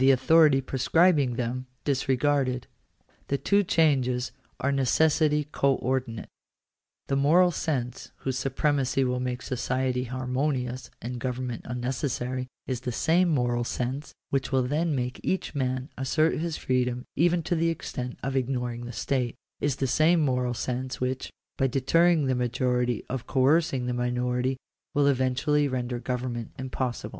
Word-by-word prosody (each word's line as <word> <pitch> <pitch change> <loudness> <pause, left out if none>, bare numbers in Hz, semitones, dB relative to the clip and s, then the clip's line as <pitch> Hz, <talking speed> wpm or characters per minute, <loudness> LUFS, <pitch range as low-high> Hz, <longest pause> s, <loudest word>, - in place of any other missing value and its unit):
authority 135 +2 +5
prescribing 135 +1 +3
them 125 +2 -3 0.2
disregarded. 135 -1 +1 0.6
The 140 - 0
two 200 +7 +2
changes 130 -7 +2 0.3
are 140 - 0
of 140 - +1
necessity 150 +2 +2
co 140 -2 +2
ordinate. 125 -3 -2 0.8
That 135 - 0
moral 170 +6 +5
sense 130 -7 -3
whose 130 -1 -3
supremacy 135 0 +1
will 125 -1 0
make 125 0 -3
society 125 0 -1
harmonious 130 0 -2
and 120 +1 -4
government 125 -1 -3
unnecessary, 125 0 -2 0.2
is 130 -2 -3
the 125 - -3
same 170 +8 +2
moral 120 -5 +1
sense 130 +4 -3 0.2
which 135 -1 0
will 130 -1 +3
then 150 +4 0
make 125 -1 -2
each 190 - -2
man 130 -1 -2
assert 155 +5 +2
his 165 -1 -2
freedom 125 -1 0
even 170 +2 +3
to 170 - -1
the 165 0 +2
extent 125 -6 -4
of 135 +1 -2
ignoring 125 -2 -2
the 120 - -6
state 120 +1 -1
— - - -42
is 145 -3 +1
the 135 - -1
same 155 +6 +4
moral 125 -3 +1
sense 130 +2 -3
which, 130 +1 -2 0.3
by 135 - +3
deterring 160 +5 +3
the 130 - +1
majority 125 -1 0
from 130 - -2
coercing 135 -1 +2
the 125 - -1
minority, 125 +1 0 0.4
will 145 -1 +4
eventually 140 +2 +2
render 125 -2 -2
government 125 -2 -3
impossible. 130 -1 -3
130 Hz, 145 wpm, -27 LUFS, 125-145 Hz, 0.8 s, authority